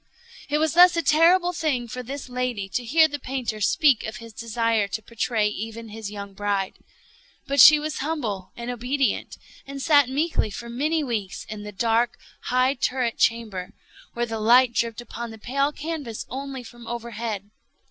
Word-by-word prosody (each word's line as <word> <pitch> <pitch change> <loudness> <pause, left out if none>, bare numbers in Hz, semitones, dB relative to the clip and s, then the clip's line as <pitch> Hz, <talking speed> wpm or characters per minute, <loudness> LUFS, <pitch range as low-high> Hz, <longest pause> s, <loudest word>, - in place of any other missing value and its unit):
It 295 - +2
was 315 -1 +1
thus 355 0 +7
a 335 - +1
terrible 345 +5 +4
thing 295 -7 -1
for 250 +2 -6
this 270 +3 -7
lady 250 -5 -2
to 245 - -2
hear 315 +7 +5
the 290 -1 -5
painter 250 -5 -4
speak 280 - +3
of 220 - -5
his 230 -1 -10
desire 230 -2 0
to 210 +3 -4
portray 230 -2 0
even 225 +2 -6
his 215 -1 -6
young 200 -1 -8
bride. 200 -1 -2 0.7
But 280 +1 -1
she 300 +4 +10
was 305 0 -4
humble 245 - -3
and 240 +1 -4
obedient, 255 +3 -1 0.3
and 275 0 -6
sat 285 -3 +4
meekly 295 -2 0
for 235 +3 -8
many 305 +6 0
weeks 215 -8 -3
in 215 -1 -7
the 210 0 -7
dark, 230 +3 +1 0.3
high 255 +2 +2
turret 250 -3 -1
chamber 215 -6 0 0.4
where 240 0 -1
the 225 -1 -4
light 240 +3 +5
dripped 230 0 -1
upon 235 0 -7
the 225 - -10
pale 275 +6 0
canvas 295 -7 -5
only 270 0 -5
from 240 0 -13
overhead. 230 -3 -5
240 Hz, 175 wpm, -24 LUFS, 220-280 Hz, 0.7 s, she